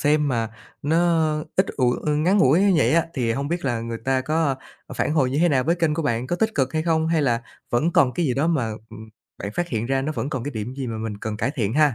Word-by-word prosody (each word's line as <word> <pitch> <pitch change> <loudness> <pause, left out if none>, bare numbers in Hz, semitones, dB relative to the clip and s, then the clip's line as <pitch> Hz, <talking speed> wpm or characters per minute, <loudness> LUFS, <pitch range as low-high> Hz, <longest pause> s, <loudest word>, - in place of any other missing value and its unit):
xem 150 0 +2
mà 115 -3 0 0.3
nó 155 +3 +1 0.6
ít 190 - +3
ủi 125 -2 +2
ơ, 150 - +2
ngắn 175 +7 +2
ngủi 150 +3 +5
như 200 -2 +4
vậy 130 -2 +3
á 165 0 +3
thì 120 -4 0
hông 140 +4 -2
biết 175 -1 -2
là 120 -4 0
người 115 0 -5
ta 135 0 +2
có 155 +1 +1 0.4
phản - - 0
hồi 135 -5 +2
như 140 - -1
thế 175 +2 +4
nào 130 -4 +2
với 170 +3 +2
kênh 165 -3 +1
của 165 - -2
bạn? 120 -4 -1
Có 175 - -1
tích 220 +1 0
cực 135 0 0
hay 155 - 0
không, 160 -1 +1
hay 165 -2 +2
là 120 -3 +1 0.3
vẫn 155 +8 +1
còn 125 -2 +4
cái 175 - 0
gì 125 - 0
đó 140 +4 +1
mà, 135 -10 0 0.2
ừm, 110 0 -10 0.3
bạn 100 - -4
phát 175 0 -1
hiện 115 -3 -2
ra 135 0 0
nó 155 +3 -2
vẫn 145 -1 -3
còn 130 -3 -3
cái 145 - -3
điểm 115 +2 -5
gì 135 -2 -4
mà 110 -1 -4
mình 110 -2 -4
cần 110 -1 -4
cải 125 - -1
thiện 110 -3 0
ha? 150 -3 +4
140 Hz, 285 wpm, -23 LUFS, 120-160 Hz, 0.6 s, ngủi